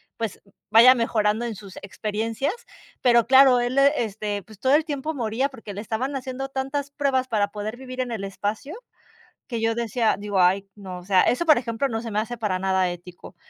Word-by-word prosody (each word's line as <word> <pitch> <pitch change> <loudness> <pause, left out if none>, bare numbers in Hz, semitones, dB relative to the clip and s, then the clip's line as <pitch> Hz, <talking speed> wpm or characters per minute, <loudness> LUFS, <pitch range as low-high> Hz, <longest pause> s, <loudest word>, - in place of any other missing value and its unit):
pues 225 -3 -5 0.3
vaya 235 +4 +8
mejorando 220 -2 0
en 230 -2 -4
sus 195 -1 -12
experiencias. 220 - -3 0.5
Pero 235 -2 +4
claro, 260 -1 +7
él, 245 +2 -1
este, 215 -7 +1
pues, 215 0 -16
todo 260 +4 +3
el 310 +1 +2
tiempo 300 0 -3
moría, 245 +1 -1
porque 225 -6 -10
le 200 - -5
estaban 235 +6 -3
haciendo 265 0 -4
tantas 275 +1 -3
pruebas 270 -3 0
para 210 -4 0
poder 210 +2 -5
vivir 255 0 -9
en 250 -1 -2
el 210 -3 -4
espacio 210 - -4 0.7
que 235 -3 -4
yo 225 0 +1
decía, 230 -1 0
digo, 205 -2 -1
ay, 190 +2 +3
no, 190 -3 -8
o 180 - -12
sea, 190 -1 +4
eso, 300 +8 +1
por 310 - +7
ejemplo, 235 +2 -2
no 225 -2 -3
se 230 - -6
me 210 - -1
hace 230 +3 -5
para 205 -4 -1
nada 190 -1 +1
ético, 175 0 -10
o - - -31
230 Hz, 205 wpm, -24 LUFS, 205-260 Hz, 0.7 s, vaya